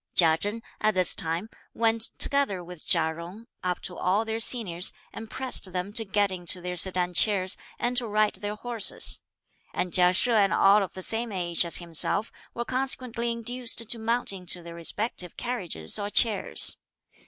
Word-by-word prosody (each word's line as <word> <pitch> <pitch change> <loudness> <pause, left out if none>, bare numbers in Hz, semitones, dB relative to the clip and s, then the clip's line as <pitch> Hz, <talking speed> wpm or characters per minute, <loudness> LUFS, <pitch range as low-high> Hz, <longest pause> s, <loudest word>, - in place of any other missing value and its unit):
Chia 160 -2 +5
Chen, 205 +7 -3 0.2
at 215 -2 0
this 185 -2 +4
time, 165 +5 -2 0.3
went, 225 0 +1
together 275 -11 +2
with 175 -2 -11
Chia 160 -2 +2
Jung, 180 +7 -10 0.2
up 180 -1 -3
to 180 - -6
all 200 +5 0
their 225 0 -3
seniors, 195 -7 0 0.2
and 225 -1 -9
pressed 255 -7 -1
them 185 +2 -4
to 225 0 +4
get 205 -1 0
into 180 0 0
their 180 0 -6
sedan 180 0 -1
chairs, 190 +1 +3 0.2
and 245 +1 -2
to 240 -2 0
ride 215 0 +1
their 205 0 -5
horses; 230 -2 0 0.5
and 180 -1 -3
Chia 180 -1 +4
She 245 +6 +4
and 205 -4 +2
all 200 +2 +4
of 195 - -5
the 185 - -8
same 225 +2 -4
age 175 -3 0
as 170 - +2
himself 175 +5 -1 0.2
were 235 - -4
consequently 255 -2 0
induced 235 0 0
to 230 - -1
mount 230 0 0
into 180 -2 -3
their 170 0 -10
respective 180 +2 -1
carriages 200 - -1
or 205 0 -4
chairs. 215 -1 +5
205 Hz, 175 wpm, -26 LUFS, 180-230 Hz, 0.5 s, Chia